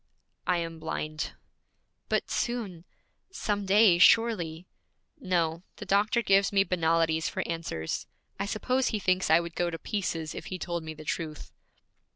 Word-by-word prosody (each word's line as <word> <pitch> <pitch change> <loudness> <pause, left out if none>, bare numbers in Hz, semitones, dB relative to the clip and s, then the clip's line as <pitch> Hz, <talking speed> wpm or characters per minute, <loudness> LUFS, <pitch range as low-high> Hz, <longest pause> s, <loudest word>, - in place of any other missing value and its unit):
'I 180 - +3
am 165 -1 -4
blind.' 155 -1 -4 0.8
'But - - 0
soon 205 -9 -2 0.4
some 205 - -2
day, 195 -3 +6
surely 180 -4 +4 0.3
' - - -50
'No. 170 - 0
The - - -8
doctor 210 +4 +2
gives 195 -1 +4
me 195 -1 +4
banalities 165 -3 +1
for - - -3
answers. 165 - -3 0.3
I 200 - -1
suppose 255 +5 0
he 220 - 0
thinks 185 -2 +1
I 160 - +7
would 170 -1 -5
go 175 0 0
to 165 - -5
pieces 165 -5 -3
if - - -7
he 185 - -4
told 170 -1 -3
me 160 0 -7
the 155 0 -11
truth.' 155 -1 -4
175 Hz, 160 wpm, -28 LUFS, 165-200 Hz, 0.8 s, I